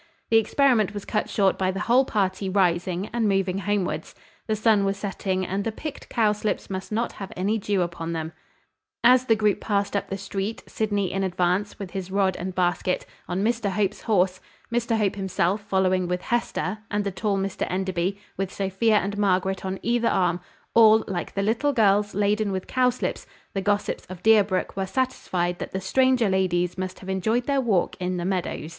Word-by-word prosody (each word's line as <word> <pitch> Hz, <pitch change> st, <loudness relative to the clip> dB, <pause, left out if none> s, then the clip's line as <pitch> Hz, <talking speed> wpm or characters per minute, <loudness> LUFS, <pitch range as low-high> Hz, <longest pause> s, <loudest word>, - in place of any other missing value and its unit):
The 225 Hz, -, +7 dB
experiment 225 Hz, -4 st, +2 dB
was 205 Hz, -, -5 dB
cut 210 Hz, -, -1 dB
short 195 Hz, -3 st, +2 dB
by 185 Hz, -1 st, +1 dB
the 190 Hz, +2 st, -2 dB
whole 245 Hz, +5 st, +4 dB
party 195 Hz, -4 st, -1 dB
rising, 180 Hz, 0 st, +1 dB
and 230 Hz, -3 st, +1 dB
moving 195 Hz, -1 st, +1 dB
homewards. 205 Hz, -2 st, -2 dB, 0.3 s
The 220 Hz, -, +1 dB
sun 215 Hz, -1 st, +3 dB
was 195 Hz, 0 st, 0 dB
setting, 190 Hz, -2 st, -2 dB
and 195 Hz, +2 st, -2 dB
the 225 Hz, -, -1 dB
picked 295 Hz, +6 st, -7 dB
cowslips 210 Hz, -2 st, 0 dB
must 190 Hz, +2 st, -5 dB
not 225 Hz, +3 st, 0 dB
have 195 Hz, -1 st, -8 dB
any 205 Hz, +5 st, 0 dB
dew 200 Hz, -2 st, +1 dB
upon 170 Hz, -1 st, -4 dB
them. 160 Hz, 0 st, -4 dB, 0.7 s
As 255 Hz, +1 st, +6 dB
the 225 Hz, -, +4 dB
group 210 Hz, -2 st, +1 dB
passed 200 Hz, -1 st, 0 dB
up 200 Hz, -, -1 dB
the 195 Hz, -, -3 dB
street, 195 Hz, +2 st, -4 dB
Sydney 205 Hz, -4 st, -1 dB
in 195 Hz, 0 st, -1 dB
advance, 185 Hz, +2 st, 0 dB
with 195 Hz, -3 st, -7 dB
his 190 Hz, -1 st, -5 dB
rod 190 Hz, -1 st, +1 dB
and 185 Hz, +1 st, -5 dB
basket, 180 Hz, 0 st, 0 dB, 0.2 s
on 185 Hz, +2 st, -1 dB
Mr 230 Hz, -2 st, +1 dB
Hope's 195 Hz, 0 st, -1 dB
horse, 185 Hz, -4 st, +1 dB, 0.3 s
Mr 235 Hz, -1 st, +1 dB
Hope 205 Hz, -3 st, +1 dB
himself 190 Hz, +1 st, 0 dB
following 185 Hz, -2 st, +1 dB
with 180 Hz, 0 st, -2 dB
Hester, 215 Hz, -5 st, -1 dB
and 205 Hz, 0 st, 0 dB
the 200 Hz, -, -2 dB
tall 200 Hz, +1 st, -1 dB
Mr 195 Hz, 0 st, -2 dB
Enderby, 190 Hz, 0 st, -1 dB, 0.2 s
with 195 Hz, 0 st, -2 dB
Sophia 200 Hz, +3 st, +1 dB
and 205 Hz, 0 st, -1 dB
Margaret 190 Hz, -1 st, +1 dB
on 190 Hz, 0 st, -3 dB
either 235 Hz, 0 st, +2 dB
arm, 180 Hz, -2 st, +1 dB, 0.3 s
all, 220 Hz, -1 st, +7 dB
like 180 Hz, -3 st, -4 dB
the 195 Hz, -, 0 dB
little 235 Hz, +8 st, +1 dB
girls, 205 Hz, -4 st, +3 dB
laden 205 Hz, +1 st, +1 dB
with 190 Hz, -1 st, -3 dB
cowslips, 255 Hz, -1 st, 0 dB, 0.3 s
the 195 Hz, -, -1 dB
gossips 205 Hz, +1 st, -1 dB
of 185 Hz, -1 st, -10 dB
Deerbrook 205 Hz, -4 st, +3 dB
were 195 Hz, -1 st, -2 dB
satisfied 185 Hz, -8 st, -1 dB
that -, -, -6 dB
the 190 Hz, -, -1 dB
stranger 255 Hz, +4 st, +3 dB
ladies 180 Hz, -2 st, +1 dB
must 185 Hz, 0 st, -5 dB
have 190 Hz, -, -10 dB
enjoyed 220 Hz, +6 st, +1 dB
their 280 Hz, -1 st, +1 dB
walk 210 Hz, -8 st, +1 dB
in 180 Hz, 0 st, -2 dB
the 175 Hz, -, -3 dB
meadows. 185 Hz, -4 st, -2 dB
195 Hz, 190 wpm, -25 LUFS, 185-215 Hz, 0.7 s, The